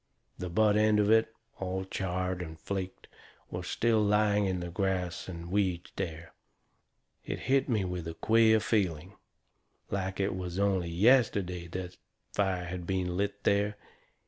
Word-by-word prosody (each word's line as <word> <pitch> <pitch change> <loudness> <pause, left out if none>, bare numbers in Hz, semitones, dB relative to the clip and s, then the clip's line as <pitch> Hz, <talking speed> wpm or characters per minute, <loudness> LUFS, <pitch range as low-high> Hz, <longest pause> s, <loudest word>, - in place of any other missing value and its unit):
The 90 - -4
butt 105 +3 +3
end 105 0 +4
of 105 +1 +3
it, 110 0 +4 0.3
all 95 0 -3
charred 95 -1 -2
and 80 -2 -7
flaked, 95 +1 -5 0.4
was - - -5
still 115 -2 +2
laying 105 -1 +3
in 95 -1 -1
the 85 0 -5
grass 90 -2 -1
and 85 -1 -7
weeds 95 -3 0
there. 80 -1 -5 0.9
It - - -5
hit 135 +3 +2
me 105 -5 +1
with 90 -2 -4
a 80 - -5
queer 110 +3 +4
feeling 95 -5 0 0.8
like 95 -1 -2
it 100 0 +1
was 90 -1 -5
only 95 -3 +1
yesterday 95 -3 +3
that 90 +1 -6 0.4
fire 95 -3 0
had 85 0 -6
been 90 -2 -1
lit 100 +1 -2
there. 105 +1 +2
95 Hz, 150 wpm, -30 LUFS, 90-105 Hz, 0.9 s, end